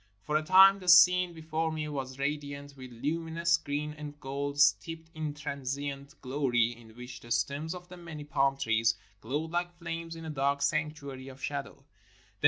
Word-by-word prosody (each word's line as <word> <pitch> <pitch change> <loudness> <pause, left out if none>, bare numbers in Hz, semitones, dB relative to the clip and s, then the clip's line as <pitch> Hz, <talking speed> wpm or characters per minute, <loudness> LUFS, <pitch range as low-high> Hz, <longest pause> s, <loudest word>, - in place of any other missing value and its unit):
For 150 - -2
a 155 - +4
time 190 +4 +7
the 185 - -11
scene 180 0 +7
before 160 0 -2
me 155 -1 -3
was 135 -3 -5
radi 145 0 -2
ant 140 0 -12
with 130 -2 -10
luminous 165 +6 0
green 150 0 -3
and 150 -1 -9
gold, 140 +1 -4
steeped 160 +3 +2
in 155 -2 -4
transient 140 0 -5
glory 125 -3 +1
in 110 -1 -16
which 125 0 -9
the 120 - -14
stems 140 +8 -1
of 180 0 -10
the 180 0 -11
many 165 -4 -8
palm 140 -2 +1
trees 115 -3 +2 0.2
glowed 150 +9 -3
like 175 0 -2
flames 165 -1 -5
in 165 0 -8
a 160 - -4
dark 140 0 0
sanctuary 150 -4 -2
of 135 0 -11
shadow. - - -4
145 Hz, 180 wpm, -30 LUFS, 135-165 Hz, 0.2 s, time